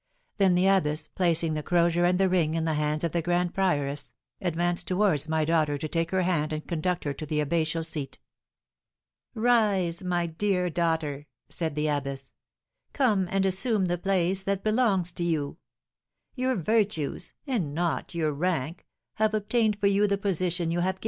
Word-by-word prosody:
Then 190 Hz, -3 st, +4 dB
the 180 Hz, +1 st, +3 dB
abbess, 155 Hz, -6 st, +2 dB
placing 170 Hz, -3 st, +1 dB
the 155 Hz, -, -2 dB
crozier 170 Hz, +1 st, +2 dB
and 180 Hz, +1 st, +2 dB
the 195 Hz, -, +4 dB
ring 170 Hz, -4 st, +1 dB
in 165 Hz, -1 st, 0 dB
the 160 Hz, -, 0 dB
hands 150 Hz, +1 st, -1 dB
of 170 Hz, -, 0 dB
the 170 Hz, -, 0 dB
grand 175 Hz, +1 st, 0 dB
prioress, 145 Hz, -8 st, -1 dB, 0.3 s
advanced 175 Hz, -1 st, -1 dB
towards 180 Hz, -6 st, +1 dB
my 160 Hz, -1 st, +1 dB
daughter 155 Hz, -2 st, +1 dB
to 155 Hz, -, -4 dB
take 165 Hz, +1 st, -1 dB
her 190 Hz, 0 st, +1 dB
hand 165 Hz, -4 st, 0 dB
and 155 Hz, 0 st, -5 dB
conduct 175 Hz, +1 st, -1 dB
her 145 Hz, -, -2 dB
to 140 Hz, -, -8 dB
the 150 Hz, 0 st, -2 dB
abbatial 160 Hz, +2 st, 0 dB
seat. 150 Hz, -4 st, -4 dB, 1.2 s
"Rise, 210 Hz, -7 st, +2 dB
my 175 Hz, -1 st, 0 dB
dear 180 Hz, +1 st, -1 dB
daughter," 160 Hz, -4 st, -1 dB, 0.2 s
said 160 Hz, -3 st, -3 dB
the 150 Hz, 0 st, -1 dB
abbess; 140 Hz, -2 st, -3 dB, 0.6 s
"come 215 Hz, -9 st, +2 dB
and 195 Hz, +1 st, +1 dB
assume 195 Hz, +2 st, +2 dB
the 175 Hz, -1 st, -1 dB
place 190 Hz, 0 st, +1 dB
that 195 Hz, 0 st, -1 dB
belongs 215 Hz, -6 st, +2 dB
to 170 Hz, -, -4 dB
you. 155 Hz, -3 st, -1 dB, 0.8 s
Your 255 Hz, 0 st, 0 dB
virtues, 190 Hz, -4 st, -1 dB
and 195 Hz, -, -2 dB
not 170 Hz, 0 st, -2 dB
your 155 Hz, -2 st, 0 dB
rank, 165 Hz, 0 st, -2 dB, 0.3 s
have 215 Hz, 0 st, +2 dB
obtained 215 Hz, 0 st, +1 dB
for 205 Hz, -, -1 dB
you 200 Hz, +1 st, +3 dB
the 200 Hz, 0 st, +1 dB
position 180 Hz, -3 st, -1 dB
you 170 Hz, -, 0 dB
have 190 Hz, +2 st, 0 dB
gained." -, -, -27 dB
175 Hz, 175 wpm, -27 LUFS, 155-195 Hz, 1.2 s, Then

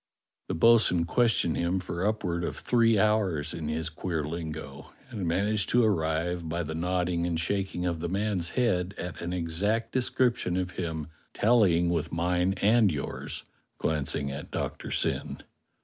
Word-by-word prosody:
The -, -, -2 dB
bo'sun 90 Hz, -3 st, +5 dB
questioned 115 Hz, -6 st, +2 dB
him 85 Hz, +2 st, 0 dB
for 90 Hz, +1 st, -2 dB
upward 90 Hz, -5 st, -1 dB
of -, -, -3 dB
three 115 Hz, -2 st, +3 dB
hours 95 Hz, -8 st, +1 dB
in 80 Hz, -3 st, -4 dB
his 80 Hz, +1 st, -2 dB
queer 80 Hz, -1 st, -3 dB
lingo, 80 Hz, -3 st, -6 dB, 0.2 s
and 100 Hz, -7 st, -3 dB
managed 100 Hz, +4 st, +1 dB
to 120 Hz, 0 st, +4 dB
arrive, 85 Hz, -3 st, 0 dB
by 85 Hz, +2 st, -1 dB
the 80 Hz, 0 st, -5 dB
nodding 90 Hz, 0 st, 0 dB
and 85 Hz, -2 st, -1 dB
shaking 95 Hz, +1 st, -1 dB
of 85 Hz, -2 st, -1 dB
the 85 Hz, +1 st, -3 dB
man's 95 Hz, -2 st, -1 dB
head, 95 Hz, -6 st, +1 dB
at 90 Hz, -1 st, -6 dB
an 85 Hz, 0 st, -3 dB
exact 100 Hz, +7 st, -1 dB
description 120 Hz, -7 st, +1 dB
of 95 Hz, 0 st, -2 dB
him 80 Hz, -4 st, -4 dB, 0.3 s
tallying 95 Hz, -7 st, +4 dB
with 80 Hz, -1 st, -1 dB
mine 90 Hz, +2 st, +1 dB
and 105 Hz, +1 st, +4 dB
yours" 70 Hz, -3 st, -4 dB, 0.3 s
(glancing 70 Hz, -2 st, -1 dB
at 70 Hz, +2 st, -7 dB
Doctor -, -, -4 dB
Syn). -, -, 0 dB
90 Hz, 155 wpm, -28 LUFS, 80-105 Hz, 0.3 s, bo'sun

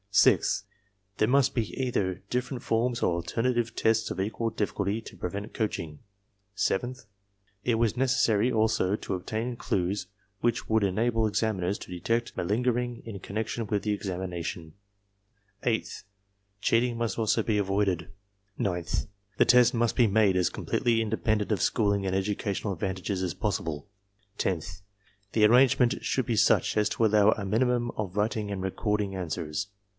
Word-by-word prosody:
Sixth, -, -, +4 dB, 0.5 s
there 110 Hz, -, +4 dB
must 135 Hz, +2 st, +3 dB
be 115 Hz, -4 st, -1 dB
either 105 Hz, -8 st, 0 dB
different 125 Hz, 0 st, -2 dB
forms 120 Hz, +1 st, 0 dB
or -, -, +3 dB
alternative 115 Hz, +8 st, -1 dB
tests 110 Hz, 0 st, +2 dB
of -, -, -4 dB
equal 110 Hz, +4 st, -1 dB
difficulty 105 Hz, -1 st, -1 dB
to 115 Hz, -, -11 dB
prevent 100 Hz, +4 st, -5 dB
coaching. 80 Hz, -9 st, -3 dB, 0.5 s
Seventh, 120 Hz, +4 st, -1 dB, 0.6 s
it 120 Hz, -, +2 dB
was 115 Hz, -2 st, +2 dB
neces 130 Hz, 0 st, +1 dB
sary 115 Hz, +1 st, +3 dB
also 110 Hz, -3 st, +2 dB
to -, -, -5 dB
obtain 110 Hz, +6 st, -3 dB
clues 95 Hz, -3 st, -1 dB, 0.3 s
which 120 Hz, -1 st, 0 dB
would 110 Hz, -1 st, +2 dB
enable 110 Hz, +3 st, +1 dB
examiners 100 Hz, -3 st, 0 dB
to -, -, -10 dB
detect 115 Hz, +7 st, -1 dB
malingering 120 Hz, +4 st, -1 dB
in 110 Hz, -4 st, -6 dB
connection 110 Hz, +3 st, -3 dB
with 100 Hz, -1 st, -1 dB
the 105 Hz, -, 0 dB
examination. 90 Hz, -4 st, -4 dB, 0.9 s
Eighth, 115 Hz, -2 st, -1 dB, 0.6 s
cheat 115 Hz, +3 st, +3 dB
ing 120 Hz, -2 st, -2 dB
must 115 Hz, -4 st, -2 dB
also 110 Hz, 0 st, +2 dB
be 105 Hz, -1 st, +1 dB
avoided. 95 Hz, -4 st, 0 dB, 0.5 s
Ninth, 90 Hz, -7 st, -1 dB, 0.3 s
the -, -, +5 dB
test 125 Hz, +1 st, +6 dB
must 120 Hz, -1 st, +1 dB
be 120 Hz, -, +5 dB
made 100 Hz, -2 st, +3 dB
ar*^ 90 Hz, -2 st, +2 dB
completely 115 Hz, -2 st, 0 dB
independent 110 Hz, -1 st, 0 dB
of 100 Hz, -, -1 dB
schooling 100 Hz, -3 st, +1 dB
and 95 Hz, 0 st, 0 dB
educational 100 Hz, +1 st, -1 dB
advantages 95 Hz, +1 st, -3 dB
as 90 Hz, -2 st, -2 dB
possible. 85 Hz, -8 st, -2 dB, 0.5 s
Tenth, 85 Hz, -1 st, -2 dB, 0.5 s
the 110 Hz, -1 st, +5 dB
arrangement 125 Hz, +1 st, +4 dB
should 130 Hz, -, 0 dB
be 115 Hz, -, 0 dB
such -, -, +3 dB
as 105 Hz, -1 st, +2 dB
to 115 Hz, -, +1 dB
allow 105 Hz, 0 st, +5 dB
a 100 Hz, -, -5 dB
minimum 120 Hz, +3 st, +1 dB
of 100 Hz, -2 st, -5 dB
writing 105 Hz, 0 st, 0 dB
in 100 Hz, -1 st, -3 dB
recording 100 Hz, +1 st, -1 dB
answers. 85 Hz, +1 st, -3 dB
105 Hz, 150 wpm, -28 LUFS, 95-115 Hz, 0.9 s, test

